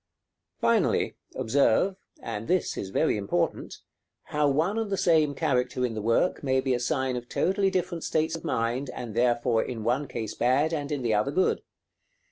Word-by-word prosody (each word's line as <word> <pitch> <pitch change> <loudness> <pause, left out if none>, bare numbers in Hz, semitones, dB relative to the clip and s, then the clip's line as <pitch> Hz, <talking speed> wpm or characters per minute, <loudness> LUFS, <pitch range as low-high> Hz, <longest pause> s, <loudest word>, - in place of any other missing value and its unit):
Finally, - - +2 0.2
observe 140 - +2 0.3
and 115 -1 -5
this 185 0 +1
is 95 - -5
very 95 - +1
important 100 -4 -1 0.5
how 150 -1 +1
one 165 +10 +1
and 220 -2 -2
the 195 - 0
same 155 -5 +3
character 125 -4 0
in 120 - -3
the 110 - -4
work 115 - +1
may 130 -2 +1
be 130 0 0
a 120 - 0
sign 130 0 -1
of 120 0 -6
totally 195 +1 +1
different 180 -3 -2
states 160 +1 0
of 165 - -8
mind, 125 -2 -1
and 115 -3 -6
therefore 120 0 +2
in 115 -3 -5
one 125 +6 0
case 115 -4 -5
bad, 140 +6 +2
and 145 -2 -3
in 145 -3 -2
the 115 -2 +1
other 105 +5 +1
good. 185 +6 +1
130 Hz, 180 wpm, -27 LUFS, 120-160 Hz, 0.5 s, same